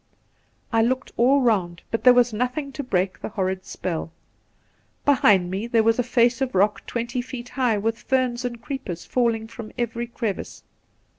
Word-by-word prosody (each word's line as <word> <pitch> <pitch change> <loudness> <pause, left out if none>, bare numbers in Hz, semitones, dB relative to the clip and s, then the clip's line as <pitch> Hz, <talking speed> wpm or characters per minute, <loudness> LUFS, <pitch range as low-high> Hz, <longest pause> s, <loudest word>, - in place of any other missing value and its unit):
I 225 - +4
looked 255 +4 0
all 265 +4 +4
round, 185 -8 +1
but 225 - -1
there 250 - +8
was 245 -2 +4
nothing 255 +5 -2
to 285 - -5
break 190 -7 -1
the - - -4
horrid 190 -3 -2
spell. 165 -2 -4 0.9
Behind 205 -10 +4
me 200 +5 -3
there 230 -2 +3
was 225 +2 +3
a - - +3
face 240 +1 +2
of 260 -6 -1
rock 205 +3 +2
twenty 235 +1 -2
feet 245 -1 -8
high 250 -5 +1
with 225 +3 -2
ferns 255 -2 0
and 240 -1 -4
creepers 265 - -6
falling 230 -3 0
from 230 -1 -9
every 235 0 -2
crevice. 230 -4 -4
235 Hz, 170 wpm, -24 LUFS, 210-250 Hz, 0.9 s, there